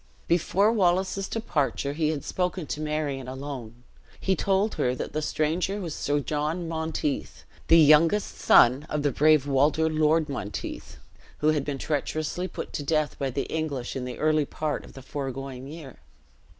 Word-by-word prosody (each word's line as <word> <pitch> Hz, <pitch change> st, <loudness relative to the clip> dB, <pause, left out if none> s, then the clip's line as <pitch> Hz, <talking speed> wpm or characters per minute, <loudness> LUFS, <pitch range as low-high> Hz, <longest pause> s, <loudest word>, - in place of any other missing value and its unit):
Before 185 Hz, +5 st, +3 dB
Wallace's 190 Hz, -1 st, +1 dB
departure 145 Hz, -9 st, -1 dB
he 155 Hz, 0 st, 0 dB
had 150 Hz, -3 st, -2 dB
spoken 180 Hz, -2 st, -2 dB
to 150 Hz, -, -4 dB
Marion 150 Hz, -4 st, -2 dB
alone; 130 Hz, -3 st, -7 dB, 0.4 s
he 190 Hz, -, +1 dB
told 195 Hz, +4 st, +1 dB
her 125 Hz, 0 st, 0 dB
that -, -, -5 dB
the 155 Hz, -, -1 dB
stranger 165 Hz, +7 st, -1 dB
was 170 Hz, -6 st, -4 dB
Sir 145 Hz, 0 st, 0 dB
John 155 Hz, +4 st, -2 dB
Monteith, 160 Hz, -3 st, -3 dB, 0.2 s
the 165 Hz, -, +7 dB
youngest 165 Hz, +6 st, +5 dB
son 130 Hz, +5 st, +5 dB
of 150 Hz, -1 st, -1 dB
the 145 Hz, -, +2 dB
brave 150 Hz, +1 st, +4 dB
Walter 145 Hz, +3 st, +2 dB
Lord 155 Hz, 0 st, +2 dB
Monteith, 100 Hz, -, -6 dB, 0.4 s
who 150 Hz, -, +2 dB
had 150 Hz, -3 st, +1 dB
been 145 Hz, -1 st, -3 dB
treacherously 155 Hz, +5 st, -2 dB
put -, -, -7 dB
to -, -, -3 dB
death 155 Hz, +1 st, 0 dB
by 135 Hz, -1 st, 0 dB
the 135 Hz, +2 st, -2 dB
English 145 Hz, -6 st, -3 dB
in 130 Hz, -1 st, -3 dB
the 125 Hz, -, -6 dB
early 155 Hz, -1 st, +2 dB
part 150 Hz, +1 st, -3 dB
of -, -, -14 dB
the 135 Hz, -, -11 dB
foregoing 135 Hz, -2 st, -5 dB
year. 150 Hz, -4 st, -10 dB
150 Hz, 165 wpm, -26 LUFS, 140-165 Hz, 0.4 s, the